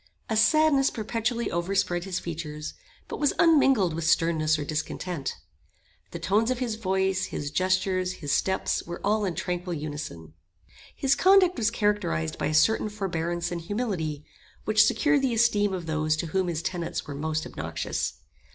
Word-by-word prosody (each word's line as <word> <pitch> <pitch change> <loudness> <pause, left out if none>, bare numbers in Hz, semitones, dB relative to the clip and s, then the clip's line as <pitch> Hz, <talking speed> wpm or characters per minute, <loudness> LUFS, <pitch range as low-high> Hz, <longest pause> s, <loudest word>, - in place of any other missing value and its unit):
A - - +2
sadness 280 +4 +4
perpetually 230 +1 -2
overspread 175 0 0
his 185 -2 -3
features, 155 -3 -5 0.3
but - - -6
was 290 - +2
unmingled 270 - +4
with 165 +1 -3
sternness 160 -2 +2
or 150 - -4
discontent. 155 0 -3 0.7
The - - -6
tones 215 +5 +1
of 255 - 0
his 245 -3 -2
voice, 190 -3 0
his 145 -1 -5
gestures, 185 +1 +1
his 145 -5 -5
steps 190 0 +1
were 175 +1 -7
all 210 +1 +1
in 180 -3 -2
tranquil 180 -1 -3
unison. 145 - -6 0.6
His 270 0 +2
conduct 375 -1 +5
was 230 -3 +1
characterised 205 - -1
by - - 0
a 155 - -2
certain 215 +6 +3
forbearance 175 -4 -2
and 170 -1 -3
humility, 170 -7 -3 0.4
which 215 0 +5
secured 300 -2 +2
the 255 -3 0
esteem 210 -3 +3
of 180 -3 -4
those 155 -1 0
to 165 - -2
whom 190 -1 +1
his 165 -2 -2
tenets 175 -3 -3
were 145 - -6
most 155 +2 -2
obnoxious. - - -4
185 Hz, 160 wpm, -26 LUFS, 160-220 Hz, 0.7 s, conduct